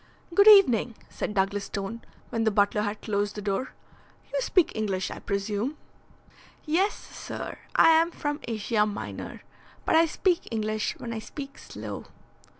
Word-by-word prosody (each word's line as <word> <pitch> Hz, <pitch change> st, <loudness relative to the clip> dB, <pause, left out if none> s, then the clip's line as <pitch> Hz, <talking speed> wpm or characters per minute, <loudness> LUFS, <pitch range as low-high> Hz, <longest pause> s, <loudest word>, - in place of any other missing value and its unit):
"Good 400 Hz, +4 st, +6 dB
evening," 250 Hz, -, +7 dB
said 210 Hz, -, -4 dB
Douglas 200 Hz, +1 st, 0 dB
Stone, 200 Hz, +4 st, -5 dB, 0.3 s
when 225 Hz, -1 st, 0 dB
the 220 Hz, -, +4 dB
butler 205 Hz, 0 st, +2 dB
had 210 Hz, 0 st, -3 dB
closed 205 Hz, -1 st, -1 dB
the 210 Hz, -, -5 dB
door. 205 Hz, +6 st, -2 dB, 0.6 s
"You -, -, +1 dB
speak 370 Hz, -8 st, +3 dB
English, 200 Hz, -4 st, -2 dB
I -, -, -6 dB
presume?" 205 Hz, +8 st, -2 dB, 0.9 s
"Yes, 365 Hz, +7 st, +2 dB
sir. -, -, -7 dB, 0.2 s
I -, -, +7 dB
am 325 Hz, +1 st, +5 dB
from 295 Hz, -3 st, -3 dB
Asia 215 Hz, -1 st, +1 dB
Minor, 205 Hz, -, -6 dB, 0.4 s
but -, -, +2 dB
I 330 Hz, +1 st, +6 dB
speak 350 Hz, +2 st, 0 dB
English 215 Hz, -1 st, -1 dB
when 230 Hz, -, -5 dB
I 225 Hz, -, -3 dB
speak 275 Hz, +5 st, -8 dB
slow." -, -, -7 dB
220 Hz, 150 wpm, -27 LUFS, 205-305 Hz, 0.9 s, evening